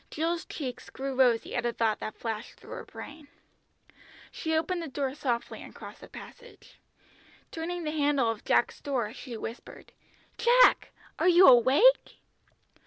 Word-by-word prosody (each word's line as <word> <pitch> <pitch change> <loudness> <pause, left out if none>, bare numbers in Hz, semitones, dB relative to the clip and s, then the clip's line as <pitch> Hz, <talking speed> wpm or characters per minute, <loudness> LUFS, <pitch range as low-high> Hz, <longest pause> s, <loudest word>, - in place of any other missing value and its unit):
Jill's 330 +2 -2
cheeks 255 -5 -7
grew 270 0 -5
rosy 250 -3 +2
at 240 - -1
a 240 - 0
thought 225 -2 0
that 215 - -6
flashed 225 -1 -5
through - - -16
her - - -7
brain. 295 0 -11 1.0
She 320 0 -3
opened 345 +2 -2
the 330 - -5
door 275 -1 -3
softly 250 -5 -3
and - - -12
crossed - - -11
the - - -11
passage. 480 0 -14 0.7
Turning 345 +2 -5
the 305 - -3
handle 290 -4 +1
of 220 - -8
Jack's - - +1
door 245 -7 -2
she 245 -3 -8
whispered, 230 +2 -9 0.5
"Jack! 480 +2 +5 0.3
Are - - +2
you 355 +2 +7
awake?" 265 - +5
280 Hz, 155 wpm, -28 LUFS, 240-330 Hz, 1.0 s, you